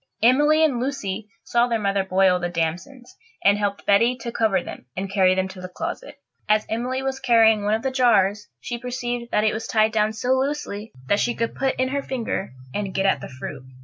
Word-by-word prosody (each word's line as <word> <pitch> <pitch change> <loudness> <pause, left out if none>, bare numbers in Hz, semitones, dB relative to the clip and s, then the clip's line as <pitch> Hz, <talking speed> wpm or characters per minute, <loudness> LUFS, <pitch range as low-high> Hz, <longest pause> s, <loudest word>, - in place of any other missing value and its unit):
Emily 295 +6 +5
and 265 -6 0
Lucy 220 -6 -3
saw 240 0 +2
their 235 -1 0
mother 200 -2 0
boil 190 -1 +3
the 175 0 -2
damsons, 175 - -4 0.3
and 200 +1 +5
helped 200 -1 -2
Betty 230 +5 +4
to 235 - -4
cover 215 -6 +1
them - - -9
and 190 0 -3
carry 185 -2 +4
them 190 0 0
to 190 -1 -10
the 185 - -7
closet. 335 - -6 0.3
As 215 0 +3
Emily 250 +4 -2
was 265 0 -2
carrying 225 -4 +4
one 210 +1 +2
of 225 - -4
the 265 - 0
jars 205 -6 +2
she 240 -1 -5
perceived 245 -1 -4
that 210 - +1
it 215 - +2
was 220 - -4
tied 220 0 +3
down 215 0 +1
so 245 +3 -4
loosely 260 -5 -1
that 205 +9 +2
she 240 - 0
could 230 0 -2
put 270 -1 -1
in 260 0 +1
her 280 +1 -1
finger 235 -7 -3 0.2
and 200 -2 -3
get 195 - +1
at 195 - +2
the - - -7
fruit. 135 +1 -7
220 Hz, 215 wpm, -23 LUFS, 195-250 Hz, 0.3 s, Emily